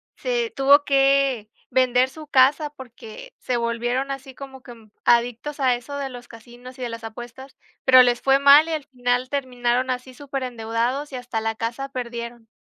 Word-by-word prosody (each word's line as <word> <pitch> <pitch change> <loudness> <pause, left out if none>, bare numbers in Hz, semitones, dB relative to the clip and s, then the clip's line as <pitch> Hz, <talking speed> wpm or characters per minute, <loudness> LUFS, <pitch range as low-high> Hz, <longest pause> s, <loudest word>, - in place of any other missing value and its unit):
se 480 -3 -2
tuvo 280 +2 +5
que 275 -5 +2 0.2
vender 255 0 +3
su 310 +2 -12
casa, 285 +2 +3
porque 245 -6 -12
se 250 -1 -2
volvieron 240 +3 -2
así 270 -1 -8
como 265 -1 -10
que, 245 - -12
mm, 220 -2 -20
adictos 240 +5 +1
a 255 -2 +3
eso 255 +4 -8
de 275 -1 -4
los 245 -1 -11
casinos 245 +2 -13
y - - -8
de 245 - -3
las 230 0 -8
apuestas, 240 +4 -10 0.3
pero 255 -1 +8
les 245 -1 +1
fue 270 0 +4
mal 280 +3 +7
y 325 - -2
al 305 - -3
final 250 0 -1
terminaron 255 -2 -1
así 255 0 -4
superendeudados 255 0 -3
y 260 - -7
hasta 245 -3 -4
la 225 0 -2
casa 235 +5 -4
perdieron. 235 -2 -7
255 Hz, 180 wpm, -22 LUFS, 240-275 Hz, 0.3 s, pero